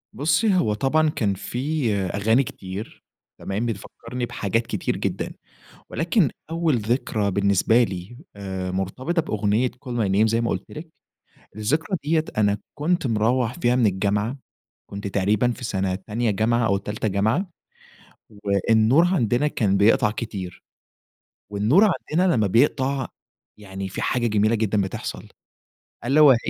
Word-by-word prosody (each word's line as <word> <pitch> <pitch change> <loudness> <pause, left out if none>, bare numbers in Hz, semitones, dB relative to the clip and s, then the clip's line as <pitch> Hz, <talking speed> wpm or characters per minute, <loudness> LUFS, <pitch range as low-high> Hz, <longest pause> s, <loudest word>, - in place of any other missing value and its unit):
بُصّي، 160 +8 +2
هو 110 -12 +2
طبعًا 150 +7 +2
كان 105 -8 0
في 125 +3 -2
أغاني 100 +6 +1
كتير 95 -2 -8 0.4
تمام؟ 105 +4 -3
بتفكرني 115 +3 -5
بحاجات 115 +1 -1
كتير - - -2
جدًا، - - -3 0.6
ولكن 170 - +2 0.2
أوّل 165 -4 +1
ذكرى 110 -2 0
بالنسبة 100 +4 +3
لي 95 +2 -4 0.2
آآ، 95 -2 -4
مرتبطة 125 - -1
بأغنية 110 +1 +1
call 125 0 -12
my 115 -5 0
name 110 +2 +5
زي 115 +1 +1
ما 115 - 0
قلت - - -4
لِك 160 +1 -9 0.6
الذكرى 155 - -1
دِيَّة 155 +1 +2
أنا 105 -1 +3 0.2
كنت 160 -1 0
مروح 115 +2 +1
فيها 120 -3 +2
من 125 -3 +3
الجامعة، 105 +6 0 0.5
كنت 100 0 -5
تقريبًا 105 +5 +1
في 125 - -8
سنة 95 -4 -1
تانية 110 +3 -2
جامعة 115 +3 +1
أو 100 - +2
تالتة 105 +2 -3
جامعة، 110 - 0 1.0
والنور 110 - +4
عندنا 150 - +1
كان 100 -8 +1
بيقطع 105 +1 +4
كتير. 100 -5 -6 0.9
والنور 110 - +4 0.3
عندنا 175 +2 +3
لمّا 110 -3 +2
بيقطع 130 +5 +2 0.5
يعني 95 -1 -6
في - - -5
حاجة 120 -2 +1
جميلة 110 +1 +2
جدًا 105 -1 +1
بتحصل، 95 -1 -5 0.8
ألا 140 +5 +3
وهي 140 -5 +8
115 Hz, 140 wpm, -23 LUFS, 100-135 Hz, 1.0 s, وهي